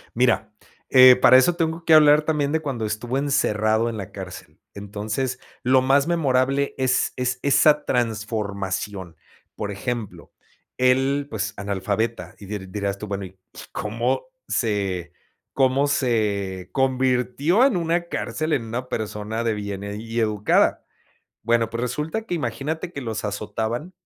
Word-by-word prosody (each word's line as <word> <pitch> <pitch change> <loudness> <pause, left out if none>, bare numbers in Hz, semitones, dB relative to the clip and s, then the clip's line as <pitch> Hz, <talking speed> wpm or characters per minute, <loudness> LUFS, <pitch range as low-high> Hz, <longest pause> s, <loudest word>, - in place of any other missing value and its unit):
Mira, - - +1 0.4
eh, 130 -1 +9
para 130 +1 +7
eso 170 +7 +4
tengo 165 0 -2
que 160 - +5
hablar 150 -1 +7
también 150 -2 0
de 160 - +1
cuando 135 -7 -3
estuvo 115 +5 -3
encerrado 110 -5 +1
en 115 - -5
la 100 -1 -7
cárcel, 95 -2 -9 0.2
entonces 105 +5 -4 0.2
lo 130 +1 +4
más 140 +2 +3
memorable 140 -4 +1
es 130 -1 +1
es 125 0 -1
esa 150 +1 +4
transformación. 105 -5 -2 0.4
Por 105 -1 -4
ejemplo, 110 +1 -5 0.5
él, 135 +3 +2
pues, 110 -1 -3
analfabeta 100 0 -2
y 100 - -10
diría 100 -1 -6
dirías 100 0 -3
tú, 105 - -6
bueno, 100 -1 -4 0.5
cómo 115 +4 -2 0.2
se 95 - -1 0.4
cómo 135 +1 +2
se 105 -9 -1
convirtió 130 - +2
en 270 -7 +2
una 170 0 0
cárcel 155 -2 -2
en 120 -5 0
una 125 +3 -5
persona 110 +1 -3
de 115 - +1
bien 100 -1 -5
y 110 +3 -4
educada. 105 -2 +2 0.6
Bueno 115 -1 +2
pues, 115 +1 -4
resulta 150 - -2
que 180 - -3
imagínate 150 +5 -3
que 140 - -5
los 110 -3 -4
azotaban 110 - -3
120 Hz, 140 wpm, -23 LUFS, 105-135 Hz, 0.6 s, eh